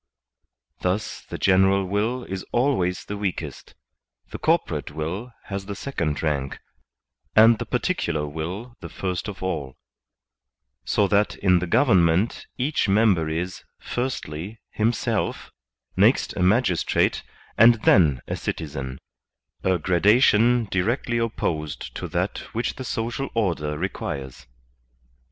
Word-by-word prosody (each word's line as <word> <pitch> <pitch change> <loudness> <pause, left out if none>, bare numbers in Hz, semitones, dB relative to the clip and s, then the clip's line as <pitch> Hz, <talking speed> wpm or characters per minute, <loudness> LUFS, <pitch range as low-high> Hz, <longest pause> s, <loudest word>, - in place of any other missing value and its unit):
Thus 95 +4 -2
the - - -4
general 95 0 +4
will 110 +6 -1
is 95 -3 -5
always 120 -9 +1
the 105 - -5
weakest, 85 -8 -5 0.6
the - - -6
corporate - - 0
will 90 +11 -4
has 100 -1 -5
the 100 - -4
second 80 - -3
rank, 70 -4 -1 0.8
and 110 +1 +7
the - - -4
particular 75 -1 -1
will 90 +11 -5
the - - -8
first 90 0 -3
of 100 -3 -7
all; 75 -8 -3 1.1
so 105 - +2
that 105 +1 +2
in 90 -2 +3
the 90 - -3
govern 115 -3 +4
ment 85 +7 +1
each 130 -4 0
member 95 -6 +3
is, 90 +4 -3 0.2
firstly, 110 - -4
himself, 115 +2 -1 0.4
next - - +3
a - - -2
magistrate, 95 -1 +2 0.3
and 115 +2 +7
then 75 - +5
a - - -2
citizen 70 -5 -4 0.3
— - - -43
a 95 -1 +2
gradation 110 - +4
directly 115 +5 0
opposed 80 -10 -3
to - - -4
that - - -2 0.2
which 115 - -1
the 130 - -5
social 120 +4 -3
order 85 -9 0
requires. 70 -8 -5
95 Hz, 125 wpm, -24 LUFS, 80-115 Hz, 1.1 s, and